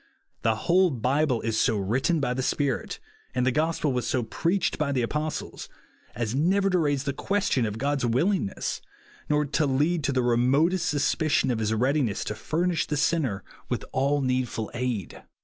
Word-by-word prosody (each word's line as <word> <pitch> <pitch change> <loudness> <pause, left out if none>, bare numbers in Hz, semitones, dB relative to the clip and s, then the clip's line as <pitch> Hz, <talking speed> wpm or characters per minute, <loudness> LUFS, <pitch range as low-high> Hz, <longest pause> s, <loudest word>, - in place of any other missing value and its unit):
The 110 -1 +2
whole 185 +1 +4
Bible 130 0 +1
is 110 -1 -1
so 110 - +2
written 130 - +1
by 125 -3 0
the 130 - -2
Spirit, 135 0 -1 0.4
and 125 0 +1
the 130 - +3
gospel 155 0 0
was 125 -1 -1
so 125 - 0
preached 170 - -1
by 145 -2 0
the 130 -3 0
apostles, 150 +6 -4 0.5
as 115 -2 -2
never 190 +8 +2
to 180 - +3
raise 145 -4 +1
the 140 -1 -2
question 190 - 0
of 105 0 -5
God's 140 +2 -1
will 125 - +2
ingness, 180 - -2 0.5
nor 150 0 +2
to 145 +1 0
lead 150 +5 +1
to 140 - +1
the 130 -2 +1
remotest 140 +9 +2
sus 145 -1 +1
picion 155 -4 +1
of 115 - -1
his 110 -1 0
readiness 125 -1 +1
to - - -3
furnish 165 +8 -1
the 150 - -1
sinner 145 -10 0 0.3
with - - -2
all 140 +2 +1
needful 125 -4 -1
aid. 120 -7 -3
135 Hz, 185 wpm, -26 LUFS, 120-155 Hz, 0.5 s, whole